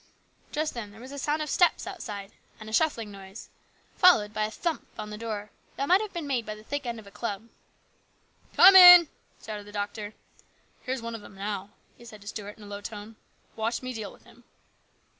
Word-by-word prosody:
Just 310 +1 -2
then 230 -4 -6
there 210 +2 -15
was 255 +3 -11
a 280 - -6
sound 300 +3 -1
of 300 - -6
steps 355 - +3
outside, 210 - -7 0.3
and 215 - -10
a 220 - -8
shuffling 230 -8 +1
noise, 195 +1 -11 0.5
followed 215 - +5
by 215 - 0
a - - -4
thump 325 +7 -3
on 210 0 -6
the - - -5
door 210 -2 -5 0.2
that 275 - -2
might 370 +3 +5
have 430 -2 -5
been 340 -4 -5
made 260 -4 -1
by 215 -1 -6
the 215 - -14
thick 285 +2 -4
end 235 -1 -3
of 215 - -14
a 200 - -14
club. 220 +1 -5 0.5
" - - -36
Come 380 +2 +9
in! 355 -3 +11 0.2
" - - -21
shouted 210 -1 -7
the - - -11
doctor. 205 +1 -5 0.3
" - - -37
Here's 255 -2 -3
one 230 0 -5
of 225 -2 -8
'em 195 - -14
now," 200 0 -5 0.3
he 235 - -14
said 215 -3 -12
to 205 - -15
Stuart 210 -1 -7
in 215 - -14
a - - -11
low 205 0 -7
tone. 210 +1 -8 0.2
" - - -37
Watch 230 +3 -2
me 255 0 -4
deal 220 -4 -6
with - - -19
him." - - -20
220 Hz, 235 wpm, -27 LUFS, 205-280 Hz, 0.5 s, in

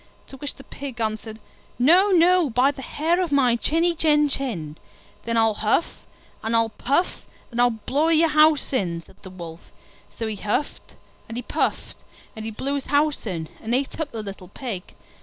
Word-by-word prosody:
To 270 - -10
which 290 +1 -5
the 270 - -13
Pig 270 -4 -8
answered, 220 0 -3 0.4
"No, 345 +11 +5
no, 360 -3 +5
by 255 +4 +3
the 270 - -10
hair 325 +7 0
of 350 -4 -2
my 260 -4 +4
chinny 330 +8 +1
chin 300 -2 +3
chin." 185 - -3 0.5
"Then 230 0 0
I'll 225 -1 +4
huff 215 +10 -1 0.3
and 225 +1 -1
I'll 230 0 +3
puff, 280 +10 -1 0.2
and 240 +1 0
I'll 245 - +5 0.2
blow 295 +4 +2
your 330 0 +4
house 305 -2 +4
in!" 170 -9 0
said - - -20
the 190 - -9
Wolf. 170 -3 -10 0.5
So 230 - -2
he 215 -2 -3
huffed 210 +9 -3 0.3
and 225 - -5
he 245 - -3
puffed, - - -2 0.4
and 220 0 -6
he - - -2
blew 260 +6 -3
his 280 -1 -2
house 290 -3 +1
in, 165 -5 -3
and 230 +2 0
ate 270 +4 -2
up 315 -2 -2
the 225 -2 -5
little 195 -2 -8
Pig. 200 -2 -7
255 Hz, 190 wpm, -24 LUFS, 220-300 Hz, 0.5 s, No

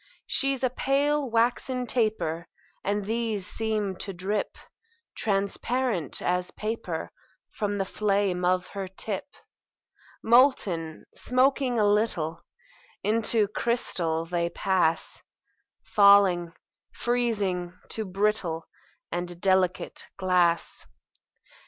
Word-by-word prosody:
She's 275 -2 +1
a 255 - +2
pale, 280 +2 +1
waxen 245 +2 +1
taper; 180 -9 -1 0.4
And 205 0 -1
these 220 -3 -1
seem 215 -3 -1
to 195 - -3
drip 195 +3 -3 0.6
Transparent 200 - -1
as 180 0 0
paper 215 -7 -4 0.4
From 205 -1 -2
the 195 - 0
flame 195 -3 0
of 180 0 +2
her 195 -1 -5
tip. 190 +4 -5 1.0
Molten, 210 - +3
smoking 255 0 +2
a 210 - +4
little, 205 -6 +1 0.6
Into 220 0 +2
crystal 175 -8 -1
they 170 0 -1
pass; 180 -3 0 0.6
Falling, 200 -4 +5 0.4
freezing, 200 -7 -1
to 220 - -2
brittle 190 -4 -1 0.5
And 175 0 -4
delicate 190 -1 +1
glass. 180 -3 +1
200 Hz, 95 wpm, -27 LUFS, 180-230 Hz, 1.0 s, Falling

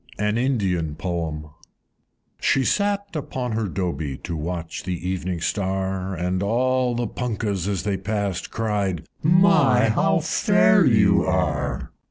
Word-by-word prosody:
An 105 +1 0
Indian 95 - 0
Poem. 80 -3 -3
I. - - -15 0.9
She 135 - +2
sate 200 -2 0
upon 130 -4 -3
her 110 -1 -1
Dobie, 80 -7 -3
To 85 - -4
watch 85 +1 -4
the 90 -1 -3
Evening 90 -2 -3
Star, 95 0 -2
And 90 +2 -1
all 125 +4 +1
the 120 0 -1
Punkahs, 105 -5 -3
as 100 -3 -1
they 100 -2 -1
passed, 100 -2 -3
Cried, 105 -6 -2 0.2
"My! 150 - +4
how 110 - +2
fair - - +3
you - - +4
are!" - - -1
100 Hz, 135 wpm, -23 LUFS, 90-120 Hz, 0.9 s, My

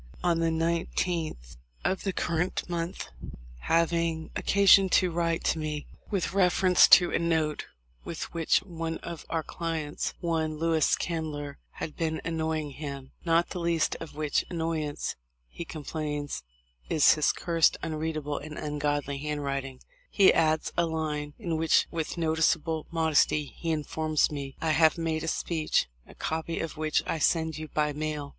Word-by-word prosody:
On 170 -2 +2
the 165 0 +2
19th 165 - -1 0.3
inst., 175 - -2 0.5
having 165 - +1
occasion 195 -1 +5
to 185 -1 +3
write 165 -1 0
me 155 -2 -3 0.2
with 180 -5 -1
reference 185 -1 +5
to 175 -1 +7
a - - +1
note 160 -2 0 0.4
with 165 - -6
which 165 -2 +2
one 165 -3 -4
of 170 -2 -7
our 165 -1 -1
clients, 160 -3 -3
one 160 -2 -1
Louis 160 -1 +2
Candler, 150 -4 -4
had 155 - -6
been 160 -2 -1
"annoying" 160 -2 -2
him, 140 -2 -7
"not 165 0 +3
the 180 - -4
least 170 -1 +1
of 165 -3 -9
which 150 -1 0
annoyance," 160 -3 -2 0.3
he 170 - -7
complains, 150 -2 -4 0.5
"is 155 - +6
his 155 - +2
cursed 165 -3 +2
unreadable 155 -2 -2
and 150 +1 -8
ungodly 145 -2 -2
handwrit 145 -2 -2
ing," 130 -1 -10 0.3
he 195 -2 +6
adds 155 -1 +1
a 170 -1 +2
line, 150 -2 -3
in 170 -7 -2
which 160 0 +3
with 165 0 -3
noticeable 160 -1 +1
mod 165 -1 0
esty 150 0 +3
he 165 - -4
informs 155 0 +1
me: 140 -2 -5
"I 160 - +2
have 160 +1 +4
made 160 -1 -1
a - - -3
speech, 160 - 0 0.2
a - - -15
copy 160 +1 -3
of 165 - -4
which 155 0 0
I 165 - -2
send 160 0 +1
you 155 - -6
by 150 -1 0
mail." 150 -1 -3
160 Hz, 150 wpm, -28 LUFS, 150-165 Hz, 0.5 s, to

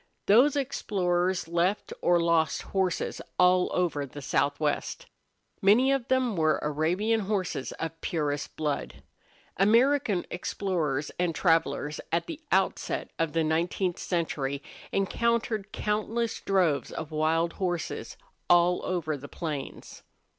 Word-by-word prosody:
Those 250 +8 +5
explorers 185 - 0
left 175 +4 0
or 175 0 +4
lost 165 -3 +2
horses 190 -2 -1 0.2
all 180 0 +4
over 170 -5 0
the 140 +1 -8
southwest. 145 +2 -1 0.6
Many 230 +7 +5
of 270 -3 0
them 255 -4 +1
were 155 -2 +2
Arabian 175 +10 +1
horses 190 -9 -2
of 165 0 -6
purest 145 -3 -2
blood. 150 -2 -3 0.5
American 230 0 +3
explorers 165 -6 -2
and 175 -2 0
travelers, 165 -3 +1
at 170 +1 +1
the 325 -1 -7
outset 190 0 0
of 165 -2 0
the 165 -1 +2
nineteenth 170 +3 0
century, 145 -5 -2 0.3
encountered 220 +1 0
countless 215 +2 -1
droves 180 -7 +1
of 160 - -6
wild 160 +2 +1
horses 175 -3 -3 0.3
all 175 0 +4
over 165 -4 -1
the 145 0 -9
plains. 150 -5 -6
175 Hz, 120 wpm, -28 LUFS, 155-200 Hz, 0.6 s, Those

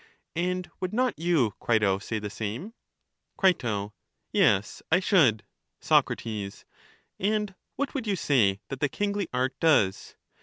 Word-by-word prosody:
And 180 +1 -1
would 185 0 -3
not 250 -7 0
you, 160 - +2
Crito, 105 -4 +2
say 110 +2 -4
the 105 -1 -5
same? 115 - -5 0.6
Cri, 190 -2 +5 0.8
Yes, 115 - +2
I 180 - +5
should. 145 - +3 0.4
Soc, - - +3 1.1
And 210 0 0 0.2
what 285 0 -2
would 255 -5 -3
you 200 - +1
say 110 - +2
that 135 - -5
the 145 - +1
kingly 200 +2 -1
art 130 +1 0
does? 130 -13 +2
160 Hz, 130 wpm, -27 LUFS, -, 1.1 s, Cri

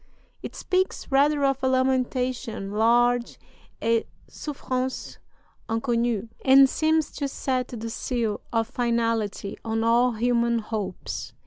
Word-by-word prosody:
It - - -7
speaks 370 -4 -1
rather 285 +1 +3
of 270 0 +1
a - - +3
lamentation 255 -4 0
large 240 +3 +2 0.5
et 230 0 +2 0.2
souffrance 260 -3 -4 0.5
inconnue, 230 -1 0 0.2
and 270 0 +7
seems 315 +2 +1
to 285 - -3
set 260 -2 -2
the 230 -2 -6
seal 230 -3 -2
of 225 -2 +1
finality 230 -5 -1
on 225 0 -1
all 240 +2 +3
human 235 +1 +1
hopes. 215 -4 -5
240 Hz, 115 wpm, -25 LUFS, 230-260 Hz, 0.5 s, and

